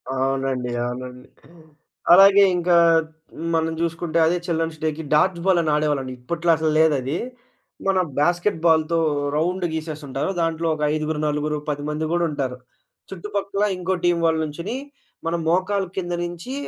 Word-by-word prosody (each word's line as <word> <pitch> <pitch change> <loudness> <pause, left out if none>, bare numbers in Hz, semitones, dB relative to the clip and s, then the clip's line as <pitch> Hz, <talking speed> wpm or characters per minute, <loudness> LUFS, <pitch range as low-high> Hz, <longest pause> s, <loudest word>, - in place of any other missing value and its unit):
అవునండి. 135 -2 -1
అవునండి. 125 +1 -7 0.9
అలాగే, 195 +2 +8
ఇంకా 175 0 +2 0.8
మనం 160 0 0
చూసుకుంటే, 170 0 -2
అదే 175 +2 +2
చిల్డన్స్ 165 -2 -2
డేకి, 155 +1 -2
డాడ్జ్ 170 +2 +2
బాల్ 185 -3 +4
అని 155 -2 0
ఆడేవాళ్ళండి. 145 -4 -1
ఇప్పట్లో 170 +6 0
అసలు 160 -1 0
లేదది. 145 -1 +2 0.7
మన 190 -1 +3 0.2
బాస్కెట్ 175 +3 +1
బాల్‌తో 160 0 +3 0.4
రౌండ్ 180 +3 0
గీసేసుంటారు, 150 -2 -4
దాంట్లో 165 0 -1
ఒక 150 - -4
ఐదుగురు, 155 0 -2
నలుగురు, 150 +1 -1
10 145 0 -3
మంది 155 +1 -2
గూడుంటారు. 145 -7 -1 0.5
చుట్టుపక్కల 200 +2 -2
ఇంకో 185 +1 -1
టీం 175 -1 +3
వాళ్ళ 160 -1 +2
నుంచునీ, 170 - -4 0.5
మనం 170 0 0
మోకాల 190 +3 +1
కింద 175 -2 -2
నుంచి 175 +9 -7
160 Hz, 135 wpm, -22 LUFS, 150-175 Hz, 0.9 s, అలాగే